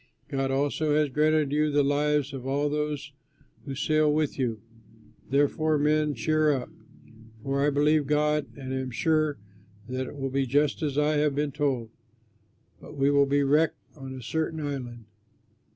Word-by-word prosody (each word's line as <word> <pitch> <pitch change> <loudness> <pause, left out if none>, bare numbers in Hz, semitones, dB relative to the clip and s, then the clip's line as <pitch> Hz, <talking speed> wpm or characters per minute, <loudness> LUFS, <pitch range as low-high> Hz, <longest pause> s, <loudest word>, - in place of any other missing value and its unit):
God 135 -1 -1
also 145 +2 0
has 150 -1 +2
granted 150 +1 +2
you 150 +1 +2
the 145 0 +2
lives 145 0 +1
of 130 -1 -6
all 140 +2 0
of 145 - 0
those 150 -1 -3 0.5
who 135 -2 -5
sail 155 +2 +2
with 150 -2 -1
you.' 115 -4 -1 0.7
Therefore, 145 +3 +2
men, 150 0 +1
cheer 155 +6 +2
up! 130 -3 -2 0.7
For 140 +1 0
I 145 - +4
believe 145 0 +2
God 150 0 +1
and 130 -1 -6
am 130 -1 -3
sure 155 +3 +1 0.5
that 130 +1 -3
it - - -9
will 135 -1 -3
be 135 0 0
just 145 +4 +1
as 145 -3 -2
I 150 0 +2
have 145 -1 +1
been 145 0 -1
told; 135 -6 -1 0.9
but 150 - -12
we 140 +1 +3
will 140 -1 +4
be 140 +1 +2
wrecked 150 +4 +2 0.2
on 135 -2 -8
a 130 - -9
certain 160 +4 -2
island." 125 -6 -5
145 Hz, 170 wpm, -27 LUFS, 135-150 Hz, 0.9 s, I